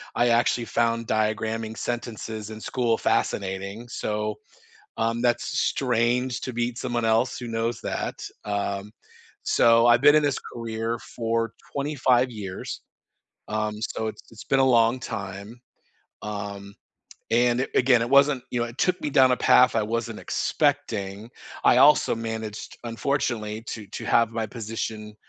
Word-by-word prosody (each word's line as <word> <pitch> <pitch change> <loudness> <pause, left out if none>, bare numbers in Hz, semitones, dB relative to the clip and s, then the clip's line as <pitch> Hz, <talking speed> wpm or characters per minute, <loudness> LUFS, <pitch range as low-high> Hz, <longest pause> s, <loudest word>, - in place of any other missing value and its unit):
I 120 - +3
actually 120 0 +2
found 115 0 0
diagramming 110 +1 -1
sentences 110 -3 -4
in 110 - -8
school 120 -2 0
fascinating, 100 +4 -1
so, 105 -2 -3 0.6
um, 115 +1 0
that's 120 -1 0
strange 125 0 +1
to 130 - -4
meet 120 0 -2
someone 120 -3 -2
else 115 +3 +2
who 125 - -6
knows 115 +1 -2
that, - - -3 0.3
um, 100 0 -2 0.6
so, 115 0 +5
I've 120 0 +5
been 145 +1 +7
in 155 - +4
this 145 -2 +1 0.2
career 115 0 -3
for 115 -1 -2 0.2
25 130 -3 +2
years, 100 -5 -6 0.7
um, 105 0 -2
so, 110 -1 -3
it's 110 - -6
it's 110 - -11
been 135 - +2
a 135 - +5
long 120 0 +4
time, 100 0 -7 0.6
um, 100 -1 -6 0.6
and, 120 +1 +3
a - - -1
again, 125 -2 +4
it 115 - -1
wasn't 140 -1 +4
you 120 - -1
know, - - +1
it 120 +2 -12
took 185 0 +1
me 150 - -1
down 130 -2 +5
a 125 - +2
path 125 -2 +5
I - - +3
wasn't 115 +1 -3
expecting. 110 -8 -1 0.3
I - - +5
also 145 +3 +5
managed, 110 -2 -5
unfortunately, 115 -3 -2
to 110 -3 -6
to - - -7
have 115 -1 +3
my 115 -1 -2
position, 110 -1 -5
115 Hz, 150 wpm, -25 LUFS, 110-125 Hz, 0.7 s, been